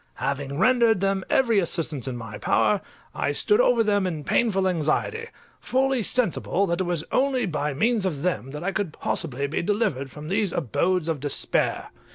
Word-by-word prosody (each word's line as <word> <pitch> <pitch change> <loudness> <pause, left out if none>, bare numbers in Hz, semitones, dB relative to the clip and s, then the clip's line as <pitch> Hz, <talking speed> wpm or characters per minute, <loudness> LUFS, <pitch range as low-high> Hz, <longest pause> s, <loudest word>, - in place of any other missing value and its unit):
Having 140 0 -3
rendered 225 +1 +4
them 195 0 0
every 230 -5 +3
assistance 160 -6 -2
in 125 -2 -3
my 115 -3 -8
power, 205 -2 +2 0.3
I - - -1
stood 420 +3 +3
over 240 - +3
them 205 -3 +1
in 160 -4 -4
painful 195 +1 +1
anxiety, 180 - -1 0.3
fully 265 -1 +1
sensible 200 -4 +1
that 170 -1 -1
it - - 0
was 175 -3 -1
only 265 -2 +1
by 150 -5 -2
means 220 - +1
of 160 -7 -2
them 135 - -1
that 150 +4 -7
I 195 - 0
could 195 -5 -3
possibly 140 -3 -2
be 140 - -2
delivered 190 - -1
from 150 +3 -9
these 200 -2 0
abodes 170 - 0
of 160 -3 -1
despair. 145 0 -1
185 Hz, 180 wpm, -24 LUFS, 150-220 Hz, 0.3 s, rendered